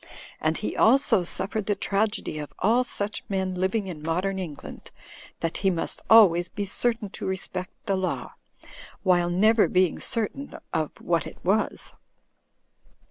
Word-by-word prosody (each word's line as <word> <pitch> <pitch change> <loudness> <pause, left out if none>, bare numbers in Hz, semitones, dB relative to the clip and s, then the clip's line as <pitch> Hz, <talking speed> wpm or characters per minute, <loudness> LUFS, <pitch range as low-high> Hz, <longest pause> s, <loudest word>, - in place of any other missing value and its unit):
And - - 0
he - - -4
also 255 -8 +4
suffered 200 +4 -3
the 205 - +1
tragedy 200 -5 -1
of 150 - -8
all 240 +3 +3
such 210 -4 -3
men 190 -1 -1
living 190 +3 0
in 175 -5 -7
modern 180 +5 -1
England; 160 -6 -8 0.5
that 165 -1 -2
he 195 - +2
must 175 -3 -3
always 180 -6 +6
be 205 +1 -4
certain 225 0 +1
to - - -6
respect 185 -1 -3 0.2
the 200 -3 +1
law, 185 -1 -3 0.7
while 175 -2 +3
never 215 +5 +4
being 185 -2 +2
certain 255 +4 -3 0.2
of 155 -2 0
what 170 -3 0
it - - -11
was. 205 +4 0
190 Hz, 145 wpm, -26 LUFS, 175-215 Hz, 0.7 s, always